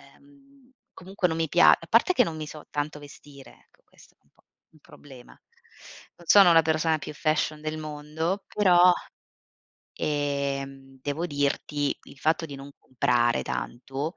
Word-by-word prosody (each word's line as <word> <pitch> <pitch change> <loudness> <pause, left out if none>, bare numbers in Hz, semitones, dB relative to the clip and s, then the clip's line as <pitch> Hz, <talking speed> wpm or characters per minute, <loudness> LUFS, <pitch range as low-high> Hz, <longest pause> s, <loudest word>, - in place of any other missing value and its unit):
ehm, 280 -2 -24 0.2
comunque 190 0 -2
non 160 -1 -3
mi 160 -2 -1
pia - - +6
a - - -14
parte 365 - +3
che 250 - +4
non 160 -5 -5
mi 155 - -6
so 150 0 -11
tanto 150 +1 -4
vestire, 145 -1 -14
ecco - - -33
questo - - -22
è - - -65
un - - -35
po' - - -32 0.3
un 155 - -23
problema. 130 -4 -16 0.8
Non 175 - -18
sono 195 -3 +7
la 165 - +7
persona 160 0 +1
più 150 - -8
fashion 155 0 -1
del 155 0 -4
mondo, 155 +5 -4
però, 180 -3 +5 1.0
ehm, 140 -2 -3
devo 145 +5 -3
dirti 145 -1 -1
il 140 - -16
fatto 160 +3 0
di 145 - -9
non 135 +1 -10
comprare 120 -1 0
tanto, 135 +7 -5
155 Hz, 160 wpm, -26 LUFS, 140-170 Hz, 1.0 s, sono